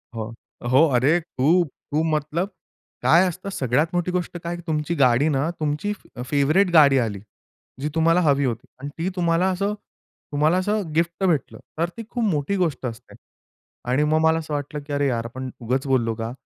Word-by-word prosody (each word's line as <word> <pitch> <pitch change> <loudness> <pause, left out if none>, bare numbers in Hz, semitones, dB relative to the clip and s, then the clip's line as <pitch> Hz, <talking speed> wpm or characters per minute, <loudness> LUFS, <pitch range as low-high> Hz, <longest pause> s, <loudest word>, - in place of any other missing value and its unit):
हो, 110 +1 -5 0.4
हो, 140 +6 +6
अरे, 145 +8 +4
खूप-खूप 160 0 0
मतलब 155 +6 -1 0.5
काय 180 +3 +5
असतं, 185 +3 -5
सगळ्यात 140 -1 +1
मोठी 175 0 0
गोष्ट 180 -1 -2
काय 175 +1 -3
तुमची 155 +1 -1
गाडी 130 +1 +4
ना 145 +3 0
तुमची 155 +7 -1 0.2
अ, 125 - -6
फेव्हरेट 150 +8 +2
गाडी 140 -4 +7
आली. 105 -4 -2 0.6
जी 150 - -1
तुम्हाला 165 +2 +4
हवी 140 -3 +3
होती 115 -1 -3
आणि 140 +1 -6
ती 170 +3 -1
तुम्हाला 170 +1 +2
असं 200 +3 -1 0.6
तुम्हाला 155 +5 +2
असं 205 +3 0
गिफ्ट 170 +3 0
भेटलं. 160 -7 0 0.2
तर 170 +1 0
ती 230 - -5
खूप 240 -2 -2
मोठी 170 -1 0
गोष्ट 165 -7 -1
असते. 115 0 -7 0.7
आणि 135 +4 +2
मग 155 +1 +2
मला 160 0 +3
असं 155 -2 -6
वाटलं, 145 +1 -3
की 145 - -4
"अरे 145 0 +1
यार! 115 -2 -1
आपण 130 +2 -6
उगाच 130 +4 -1
बोललो 120 -4 +2
का?" 115 +1 -4
150 Hz, 180 wpm, -23 LUFS, 135-175 Hz, 0.7 s, गाडी